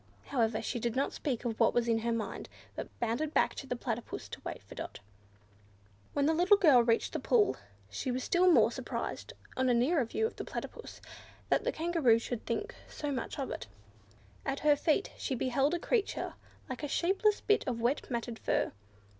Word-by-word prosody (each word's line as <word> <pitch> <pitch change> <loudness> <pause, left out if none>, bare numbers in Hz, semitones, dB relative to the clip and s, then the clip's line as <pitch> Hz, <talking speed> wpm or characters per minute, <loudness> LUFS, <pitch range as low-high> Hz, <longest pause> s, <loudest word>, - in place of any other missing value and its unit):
However, 230 -5 +1
she 245 - -2
did 235 0 -1
not 275 +2 0
speak 255 -4 -3
of 225 -2 -2
what - - +4
was 240 -1 +2
in 225 -1 +3
her 235 +1 -1
mind, 230 -2 -3 0.3
but - - -5
bounded 240 +7 -1
back - - +3
to 270 - -7
the 250 - -1
Platypus 235 -1 -4
to - - -8
wait - - -6
for - - -12
Dot. - - -7 1.1
When 285 - +2
the 320 - +4
little 360 +5 +5
girl 300 -11 +7
reached 230 -1 +1
the - - -1
pool, 220 - +3 0.3
she 100 - -4
was 255 +1 -1
still 360 +1 +4
more - - +6
surprised, - - -4 0.2
on 260 0 +2
a 245 - +4
nearer 270 +5 +3
view 445 - -1
of 445 - -4
the - - -4
Platypus, 460 - -7 0.5
that - - +2
the - - +2
Kangaroo 320 -8 +3
should 230 0 -5
think 415 - -2 0.2
so 295 -1 -4
much 255 -4 -3
of 275 -2 -3
it. 110 - -5 0.8
At 275 +1 -2
her 300 -1 +5
feet 310 +6 +1
she 265 - -1
beheld 270 +6 +1
a - - -2
creature 440 +3 -1 0.3
like 255 - -5
a 295 - -2
shapeless 390 +7 +2
bit 420 - +3
of 240 -3 -1
wet 240 +5 0
matted 235 -2 -3
fur. - - 0
260 Hz, 200 wpm, -32 LUFS, 235-315 Hz, 1.1 s, girl